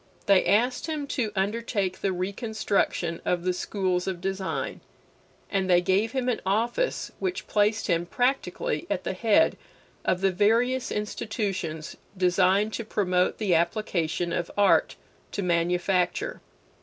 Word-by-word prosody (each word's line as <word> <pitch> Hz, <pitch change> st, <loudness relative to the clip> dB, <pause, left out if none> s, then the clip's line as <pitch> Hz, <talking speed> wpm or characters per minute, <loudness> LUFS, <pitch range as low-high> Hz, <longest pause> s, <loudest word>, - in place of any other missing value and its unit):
They 195 Hz, -2 st, +5 dB
asked 245 Hz, +8 st, +2 dB
him 305 Hz, -3 st, -2 dB
to 230 Hz, -6 st, -1 dB
undertake 200 Hz, -1 st, -1 dB
the 195 Hz, -, +1 dB
reconstruction 195 Hz, -2 st, -1 dB
of 175 Hz, -1 st, 0 dB
the 185 Hz, 0 st, +1 dB
schools 185 Hz, -1 st, -1 dB
of 185 Hz, -2 st, -2 dB
design, 190 Hz, +1 st, -3 dB, 0.7 s
and 190 Hz, -2 st, 0 dB
they 175 Hz, -1 st, +6 dB
gave 195 Hz, +6 st, +1 dB
him 260 Hz, -2 st, -1 dB
an 245 Hz, -, 0 dB
office 230 Hz, -, 0 dB
which 380 Hz, +1 st, -2 dB
placed 210 Hz, +1 st, +1 dB
him 170 Hz, -2 st, 0 dB
practically 245 Hz, -, -1 dB
at 190 Hz, -2 st, -1 dB
the -, -, -2 dB
head 220 Hz, +9 st, +3 dB, 0.5 s
of 180 Hz, -, 0 dB
the 195 Hz, -1 st, +3 dB
various 235 Hz, +7 st, +2 dB
institutions 195 Hz, -6 st, -3 dB, 0.2 s
designed 185 Hz, +3 st, +3 dB
to 230 Hz, -, -3 dB
promote 185 Hz, -4 st, +1 dB
the 205 Hz, -5 st, +1 dB
application 170 Hz, -1 st, 0 dB
of 175 Hz, -, -2 dB
art 205 Hz, -1 st, +4 dB, 0.4 s
to 200 Hz, -, -2 dB
manufacture. 175 Hz, +1 st, 0 dB
195 Hz, 135 wpm, -26 LUFS, 180-220 Hz, 0.7 s, they